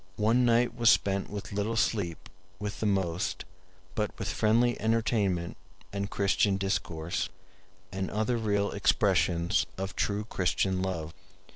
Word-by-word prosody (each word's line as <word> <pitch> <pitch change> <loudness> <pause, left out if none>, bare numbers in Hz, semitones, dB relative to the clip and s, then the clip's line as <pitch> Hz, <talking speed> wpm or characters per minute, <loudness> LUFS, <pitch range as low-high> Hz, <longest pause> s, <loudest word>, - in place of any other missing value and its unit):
One 115 +4 +3
night 120 0 +3
was 115 -2 +4
spent 100 -2 +2
with 100 -1 -6
little 105 +3 -1
sleep 100 -7 -1 0.3
with 105 +1 -5
the 110 - 0
most, 90 -4 -1 0.5
but 105 -1 0
with 100 - -3
friendly 115 +2 +2
entertainment 110 -6 0 0.4
and 100 0 -2
Christian 100 0 +2
discourse, 85 -4 -2 0.6
and 95 0 -3
other 110 +3 0
real 100 -2 0
expressions 90 -4 +2
of 95 +1 -4
true 105 +1 -1
Christian 95 -2 0
love. 85 -4 -3
100 Hz, 130 wpm, -29 LUFS, 95-110 Hz, 0.6 s, was